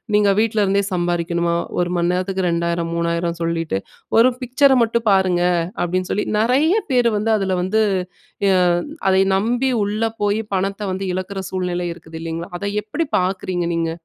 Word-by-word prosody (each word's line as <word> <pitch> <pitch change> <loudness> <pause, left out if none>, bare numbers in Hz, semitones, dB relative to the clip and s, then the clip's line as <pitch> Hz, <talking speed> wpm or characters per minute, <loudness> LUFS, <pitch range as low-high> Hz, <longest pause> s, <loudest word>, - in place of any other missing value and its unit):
“நீங்க 210 -1 +4
வீட்ல 220 -1 +1
இருந்தே 200 +1 +2
சம்பாரிக்கணுமா? 170 -1 0 0.2
ஒரு 175 0 +1
மணி 170 0 +1
நேரத்துக்கு 185 0 -1
2000, 170 0 -1
3000” 170 0 -1
சொல்லிட்டு, 165 -9 -1 0.4
“ஒரு 255 +3 +6
பிக்சர 270 +3 +3
மட்டும் 230 0 -1
பாருங்க,” 185 -2 +3 0.4
அப்டீன்னு 180 +1 -2
சொல்லி 210 - -1
நெறைய 270 - +3 0.2
பேர் 245 -2 +3
வந்து 215 +2 -1
அதுல 190 -1 -1
வந்து 215 +4 +1 0.7
எ - - +4 0.6
அதை 190 0 +4 0.2
நம்பி 240 +6 +1 0.2
உள்ள 210 +2 -2 0.2
போயி, 205 +1 +1
பணத்த 195 +2 -1
வந்து 190 +1 -3
இழக்கிற 185 +2 -4
சூழ்நிலை 180 -1 -2
இருக்குது, 160 -1 -11
இல்லைங்களா? 165 +1 -5
அத 200 - -6 0.2
எப்படி 255 +11 -2
பாக்குறீங்க 185 -1 -1
நீங்க? 165 -1 0
185 Hz, 155 wpm, -20 LUFS, 170-210 Hz, 0.7 s, ஒரு